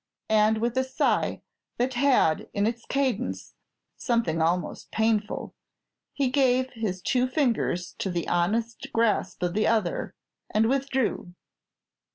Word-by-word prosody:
And 215 0 +4
with 235 +2 -1
a - - +2
sigh 260 0 0 0.3
that 250 +2 0
had 250 - +2
in 200 0 +2
its 230 +1 -2
cadence 275 -3 -1 0.4
something 230 -10 0
almost 175 +2 -1
painful, 220 -1 0 0.6
he 275 -2 0
gave 260 -1 +2
his 205 -6 -4
two 250 0 +2
fingers 240 - 0
to 195 - -1
the 175 -2 -2
honest 225 +9 0
grasp 225 -5 +1
of 175 -1 0
the 215 +2 +1
other, 215 -6 0 0.3
and 220 +1 +2
withdrew. 265 -8 -1
225 Hz, 130 wpm, -26 LUFS, 195-255 Hz, 0.6 s, And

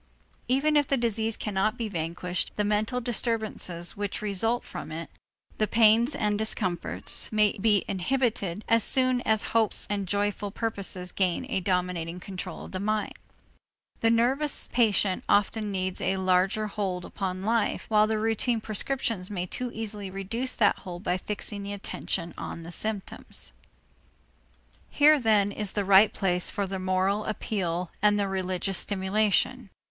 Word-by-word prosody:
Even 275 +4 +2
if 290 -2 +4
the 275 - +2
disease 225 -2 -1
cannot 210 +1 -1
be 230 - -2
vanquished, 175 0 -2
the 210 - +1
mental 210 +4 0
disturbances 220 -7 -2
which 205 -1 -3
result 215 +4 0
from - - -7
it, 165 +1 -6 0.5
the 215 - +2
pains 225 +4 +4
and 210 -1 0
discomforts, 185 -5 0
may 210 -1 +3
be 205 -1 +3
inhibited, 210 -2 -1
as 230 -1 +4
soon 255 -1 +3
as 220 0 +4
hopes 225 -2 +2
and 200 -2 -1
joyful 205 +1 -1
purposes 195 -4 -2
gain 185 +5 0
a 190 - +1
dominating 180 -2 -1
control 185 0 -7
of - - -11
the 185 - -4
mind. 215 +1 -1 0.9
The 225 - +3
nervous 260 +6 +2
patient 210 -5 +2
often 205 +1 +2
needs 185 -1 -2
a 190 - +1
larger 190 +3 +2
hold 195 -4 -3
upon 185 -2 -4
life, 225 +1 0
while 215 -1 +4
the 220 0 0
routine 225 +2 +1
prescriptions 220 -2 -2
may 180 -3 -3
too 250 +7 -4
easily 210 -3 -3
reduce 205 +7 -3
that 205 -3 +3
hold 175 0 -8
by 180 -2 0
fixing 205 +1 -3
the 200 0 -5
attention 175 -3 -4
on 165 - -6
the 170 - -8
symptoms. 210 +1 -4 1.4
Here 300 +1 +5
then 210 -4 +3
is 205 -1 -4
the 205 -2 0
right 200 +2 +7
place 180 -2 +1
for 200 -2 -1
the 190 0 -4
moral 185 +3 +1
appeal 180 -5 -2
and 205 0 +4
the 200 - +1
religious 190 0 -1
stimulation. 205 +4 +1
205 Hz, 150 wpm, -27 LUFS, 185-225 Hz, 1.4 s, right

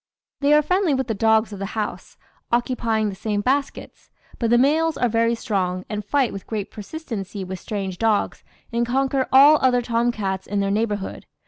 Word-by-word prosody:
"They 290 +1 +4
are 300 - +4
friendly 365 -2 +1
with 265 0 -1
the 225 - -2
dogs 220 +1 +2
of 200 - -8
the 195 +3 -5
house, 210 -1 -4 0.3
occupying 235 -3 0
the 195 - -6
same 205 0 -2
baskets; 275 +5 -2 0.3
but 230 - 0
the 240 - +5
males 310 +5 +2
are 245 - +2
very 230 +1 +1
strong, 185 -5 -2
and 210 -1 -3
fight 265 +3 +1
with 195 - -8
great 210 -3 -4
persistency 210 - -6
with 185 0 -6
strange 190 -2 -5
dogs, 220 -2 0 0.3
and 235 0 +1
conquer 265 +2 0
all 285 +3 +7
other 250 -2 +3
tom 235 0 +1
cats 190 -4 -3
in 205 0 -1
their 195 0 0
neighbourhood. 205 -2 -2
225 Hz, 190 wpm, -22 LUFS, 205-260 Hz, 0.3 s, all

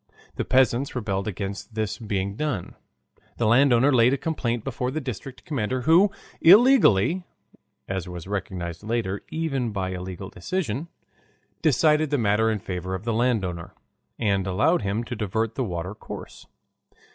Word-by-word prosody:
The - - -2
peasants 130 +1 +2
rebelled 100 -5 -2
against 100 +2 -5
this 110 -2 -2
being 100 -3 -2
done. 145 - -3 0.6
The 120 - 0
land 130 +5 +5
owner 130 +4 +4
laid 125 +1 +5
a - - +1
complaint 120 -7 -2
before 125 - -2
the 150 +4 -2
district 130 -1 -7
commander, 130 -3 -2
who 165 +9 +5 0.3
illegally 185 - +6 0.6
(as 95 -2 -3
was 90 -2 -7
recognized 95 -4 -4
later 110 -3 -2
even 140 -8 -2
by 95 -2 -2
a 90 -1 -5
legal 95 +1 -7
decision) 145 - -3 0.7
decided 155 0 +3
the 145 - +1
matter 110 -1 +2
in 110 - 0
favor 95 -1 -4
of 95 - -6
the 115 0 -1
landowner, 105 -8 -1 0.4
and 100 -4 0
allowed 145 - +2
him 100 +3 -1
to - - -5
divert 110 +2 -1
the 130 - -2
water 90 -2 -4
course. 110 - -10
110 Hz, 155 wpm, -25 LUFS, 95-135 Hz, 0.7 s, illegally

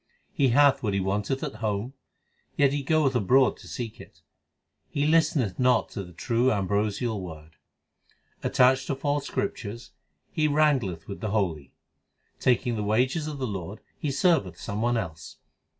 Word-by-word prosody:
He 140 - +3
hath 140 +3 +4
what 105 -4 -1
he - - +1
wanteth 100 +7 -1
at 110 - -5
home, 110 +3 -2 0.6
yet 140 -1 +4
he 145 - -1
goeth 145 -1 +2
abroad 125 +4 +3
to - - -14
seek 115 -3 -6
it: - - -17 0.3
{ - - -54 0.3
He 145 0 -1
listeneth 150 - +2
not 125 0 +3
to 100 - -5
the 90 - -12
true 120 +8 +1
ambrosial 105 +2 -1
Word. 80 -3 -10 0.8
Attached 130 +1 +3
to 140 - -1
false 145 +1 -1
scriptures, 115 +1 -4 0.4
he 155 -1 +1
wrangleth 140 - +1
with 100 - -7
the 110 - -2
holy. 85 -10 -2 0.6
Taking 125 -2 +1
the 105 - -2
wages 130 +9 +1
of 150 -2 -5
the 130 - -2
Lord 100 -1 -5 0.2
he 150 - -2
serveth 135 - +1
some 105 +1 -4
one 120 +1 +1
else. 80 -7 -6
120 Hz, 165 wpm, -26 LUFS, 100-135 Hz, 0.8 s, hath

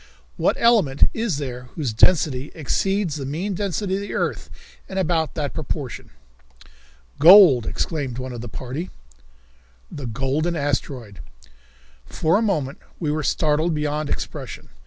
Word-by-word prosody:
What - - +1
element 210 - +4
is 220 -9 -1
there 125 -3 -5
whose 140 -9 -2
density 140 +1 +3
exceeds 175 +2 -1
the 140 - -5
mean 175 +8 -3
density 195 +1 -2
of 195 - -1
the 205 - -5
earth - - -2 0.4
in 190 - -5
about 165 -4 0
that 145 -3 -2
proportion?" 150 -5 -5 1.1
"Gold," 165 - +8
exclaimed 140 -7 -3
one 130 0 -5
of 120 - -6
the 120 - -7
party. 130 - -5 1.0
The 140 -4 -6
Golden 135 +8 -1
Asteroid! 130 - -3 0.9
For 165 +5 +1
a - - -1
moment 155 -11 -1 0.2
we 155 -4 -1
were 155 +1 -1
startled 155 +2 +1
beyond 150 0 -2
expression. - - -6
150 Hz, 135 wpm, -22 LUFS, 135-175 Hz, 1.1 s, Gold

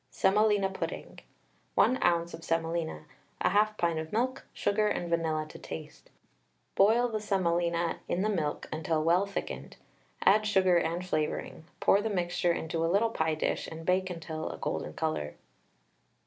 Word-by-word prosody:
SEMOLINA 205 0 +3
PUDDING. 190 - -5 0.6
1 255 - +4
oz. 170 -1 +2
of 165 0 -8
semolina, 165 -1 -2 0.4
1/2 210 +2 +3
pint 170 -2 +1
of 160 0 -6
milk, 255 +4 -1
sugar 210 +1 +1
and 175 -4 -2
vanilla 160 -2 0
to - - -11
taste. 80 0 -9 0.6
Boil 225 +5 +4
the 220 -2 -2
semolina 170 -4 0
in 185 - 0
the - - +2
milk 160 -8 -2
until 160 0 0
well 175 +5 +3
thickened, 200 - -5 0.5
add 215 +2 +5
sugar 185 -4 +4
and 170 +2 -1
flavouring, 155 -1 -2
pour 200 - +4
the 220 - -1
mixture 175 -2 0
into 165 0 -2
a 165 - +1
little 220 +4 +3
pie 160 -5 0
dish, 155 - -1
and 165 0 -8
bake 185 +1 +2
until 160 - -5
a 80 - -6
golden 75 +1 -3
colour. 75 - -2
175 Hz, 155 wpm, -30 LUFS, 160-200 Hz, 0.6 s, add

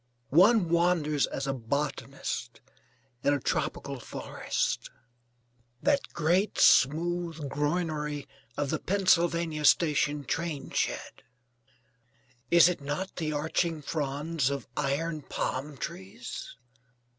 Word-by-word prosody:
One 190 - +5
wanders 170 -4 +2
as 135 - -4
a 135 - 0
botanist 135 -2 -3 0.6
in 145 - +3
a - - -1
tropical - - -2
forest. - - -3 0.9
That 285 -1 +2
great 175 +5 +1
smooth 170 +3 +4
groinery 150 -1 -1 0.3
of 145 -2 -1
the 155 - 0
Pennsylvania 170 -5 +2
Station 150 0 +3
train 165 0 -3
shed: - - -2 1.3
is 170 -1 +7
it 180 -4 -1
not 145 +7 -4
the 155 -3 -1
arching 155 +1 -1
fronds 145 0 -1
of 140 -1 -4
iron 150 +3 -1
palm 140 +1 -3
trees? 110 +3 -7
150 Hz, 100 wpm, -29 LUFS, 140-170 Hz, 1.3 s, is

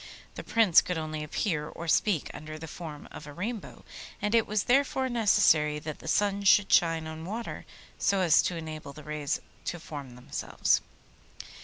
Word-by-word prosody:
The - - -7
Prince 220 -7 +5
could 180 - -3
only 155 -1 -4
appear 150 -1 -2
or 170 - -8
speak 170 0 +2
under 155 0 -8
the 160 +1 -8
form 155 -3 -8
of 150 - -10
a 145 - -9
Rainbow, 210 +7 -6 0.3
and 210 +1 -1
it 230 -2 +4
was 210 -1 0
therefore 265 0 +2
necessary 160 -10 +3
that 150 0 -6
the - - -11
sun 200 +3 +1
should 200 0 +5
shine 165 -2 +3
on 160 0 -7
water 220 +7 -6 0.3
so 195 -1 +2
as 165 -4 +5
to 180 - -2
enable 155 -3 -7
the 150 - -11
rays 150 -1 -2 0.3
to 175 - -3
form 140 -6 -8
themselves. 125 - 0
165 Hz, 175 wpm, -29 LUFS, 150-205 Hz, 0.3 s, Prince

